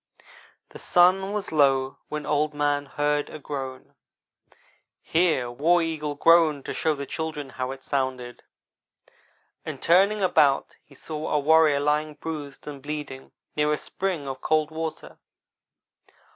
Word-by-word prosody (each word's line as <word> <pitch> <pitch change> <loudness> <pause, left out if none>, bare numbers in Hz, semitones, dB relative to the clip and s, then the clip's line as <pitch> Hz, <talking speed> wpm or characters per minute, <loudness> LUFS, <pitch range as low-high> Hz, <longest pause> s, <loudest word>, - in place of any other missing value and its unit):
"The - - -12
sun 185 +2 +4
was 210 -1 -2
low 135 -3 +2
when 150 -1 -4
Old 150 0 0
man 145 -1 0
heard 145 +1 -1
a - - -8
groan" 135 -3 -7 1.1
(here 160 -8 +1
War 165 +7 +3
Eagle 150 -2 -3
groaned 160 -2 +4
to - - -4
show 155 -1 0
the 140 0 -5
children 155 -3 -5
how 130 0 -4
it 135 0 -8
sounded), 130 -3 -3 1.2
"and - - -6
turning 195 +4 +3
about 150 -6 +3
he 140 - -20
saw 155 +2 -6
a 150 - +2
warrior 155 0 +4
lying 150 +1 0
bruised 150 -4 -7
and 145 -2 -8
bleeding 145 -2 -6 0.2
near 150 0 +1
a 150 - +1
spring 180 -6 -3
of 135 -1 -6
cold 155 0 +1
water. 160 0 -6
150 Hz, 140 wpm, -25 LUFS, 140-160 Hz, 1.2 s, sun